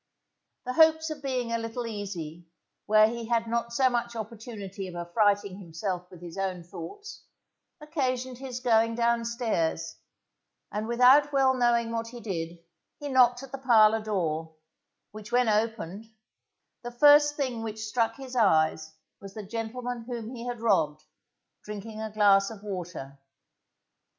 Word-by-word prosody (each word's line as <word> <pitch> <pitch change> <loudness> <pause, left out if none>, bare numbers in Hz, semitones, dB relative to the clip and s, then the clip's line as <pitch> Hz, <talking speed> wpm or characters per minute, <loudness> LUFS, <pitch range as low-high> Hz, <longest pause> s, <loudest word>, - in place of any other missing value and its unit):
The 255 - -2
hopes 320 +1 +4
of 300 -2 -6
being 255 -4 -2
a 230 - 0
little 230 +1 -4
easy 175 -7 -6 0.4
where 215 0 +6
he 230 0 -5
had 230 -1 +1
not 235 0 -1
so 260 +2 +3
much 240 -1 -1
opportunity 215 -3 -7
of 180 - -9
affrighting 200 +2 +1
himself 180 0 -5
with 175 -1 -13
his 175 +2 -8
own 185 -2 -2
thoughts, 405 - -9 0.6
occasioned 260 -5 -2
his 255 -2 -6
going 230 -2 +3
downstairs, 230 -9 0 0.7
and 210 +1 -3
without 255 +5 +5
well 270 -2 +4
knowing 240 -2 +2
what 230 0 -2
he 240 +1 -9
did, 175 -6 -4 0.4
he 290 -1 -5
knocked 250 -1 +4
at 270 - -10
the 275 - -6
parlour 225 -4 +5
door, 165 -7 -2 0.6
which 215 +1 -10
when 245 0 +3
opened, 215 -2 -1 0.7
the 240 - -6
first 290 +4 +6
thing 255 -6 -2
which 220 0 -5
struck 225 +1 0
his 265 -2 -9
eyes 160 -7 +2 0.2
was 195 -1 -11
the 215 -2 -6
gentleman 235 +3 -4
whom 235 -1 -6
he 240 0 -7
had 240 -2 -4
robbed, 155 -9 +1 0.6
drinking 210 +1 -7
a 220 - -4
glass 200 -2 +4
of 215 -3 -11
water. 175 -9 -6
225 Hz, 150 wpm, -28 LUFS, 195-245 Hz, 0.7 s, where